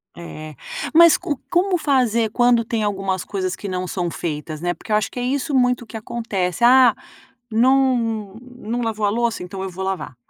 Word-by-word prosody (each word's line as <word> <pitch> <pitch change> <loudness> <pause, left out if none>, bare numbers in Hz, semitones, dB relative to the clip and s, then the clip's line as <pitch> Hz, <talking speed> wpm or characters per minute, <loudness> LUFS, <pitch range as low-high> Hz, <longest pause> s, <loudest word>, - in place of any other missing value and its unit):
É, 155 -3 -9 0.4
mas 335 0 +7
co 315 -7 -3
como 360 +1 +2
fazer 245 -7 +1
quando 240 -1 +3
tem 225 -1 -2
algumas 195 -2 -1
coisas 190 -2 -3
que 205 - -7
não 185 -1 -3
são 175 -2 -2
feitas, 155 -1 -5
né, 175 0 0
porque - - -11
eu 210 - +4
acho 210 -2 0
que 245 - -6
é - - -2
isso 280 +3 -1
muito 250 -2 +2
que 225 - -8
acontece, 215 -4 -3
"Ah, 250 -1 +6 0.6
não 230 -4 +2
não 245 -1 -6
lavou 220 -2 -1
a - - +3
louça, 235 +1 -1
então 190 +2 -6
eu 190 - -4
vou 190 +2 -6
lavar. 190 -8 -4
225 Hz, 190 wpm, -21 LUFS, 190-250 Hz, 0.6 s, mas